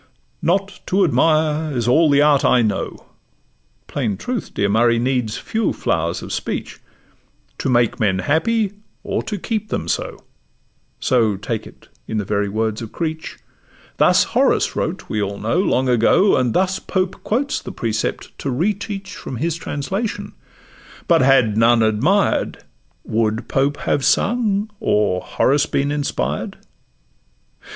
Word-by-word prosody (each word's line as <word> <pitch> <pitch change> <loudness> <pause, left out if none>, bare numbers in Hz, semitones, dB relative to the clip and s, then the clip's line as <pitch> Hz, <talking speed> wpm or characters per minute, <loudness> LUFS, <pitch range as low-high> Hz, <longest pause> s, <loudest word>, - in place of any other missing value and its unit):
'Not 195 +3 0
to 195 +2 +2
admire 155 -2 +2
is 120 -1 -1
all 155 +6 +4
the 145 0 +5
art 150 -2 +4
I 125 -2 +4
know 105 -3 -3 0.8
(Plain 115 -9 -2
truth, 245 - -4
dear 100 - 0
Murray, 115 +3 +3
needs 120 -3 0
few 225 -1 -1
flowers 85 0 -1
of - - -6
speech) - - -4 0.8
To - - -1
make 120 -2 +2
men 100 -3 +2
happy, 195 - +1 0.3
or - - -2
to 215 -2 -4
keep 215 +2 -3
them - - -3
so' - - -3 0.8
(So 110 -6 +2
take 110 +2 -4
it - - -17 0.2
in 110 - -3
the 105 - -1
very 100 0 0
words 110 +1 -2
of 115 - -7
Creech)— 160 -1 -4 0.6
Thus - - +5
Horace - - +1
wrote - - -3
we 105 - -2
all 100 0 -3
know 115 - 0
long 130 -9 +1
ago; 125 - +4
And 125 -3 0
thus 190 0 +1
Pope 185 -1 -2
quotes 270 +6 -1
the - - -7
precept 110 -2 -3
to 140 - -3
re 165 +12 +1
teach 200 -1 -7
From 130 - -7
his 165 +4 -1
translation; 190 +8 -4 0.7
but 170 -2 +4
had 130 -5 +4
none 115 0 +4
admired, 130 - +1 0.4
Would 110 +1 -1
Pope 140 +2 +1
have 140 - 0
sung, 215 - +1
or 100 -3 +1
Horace 145 +3 +1
been 140 +1 0
inspired? 145 -1 -2
135 Hz, 145 wpm, -20 LUFS, 110-185 Hz, 0.8 s, the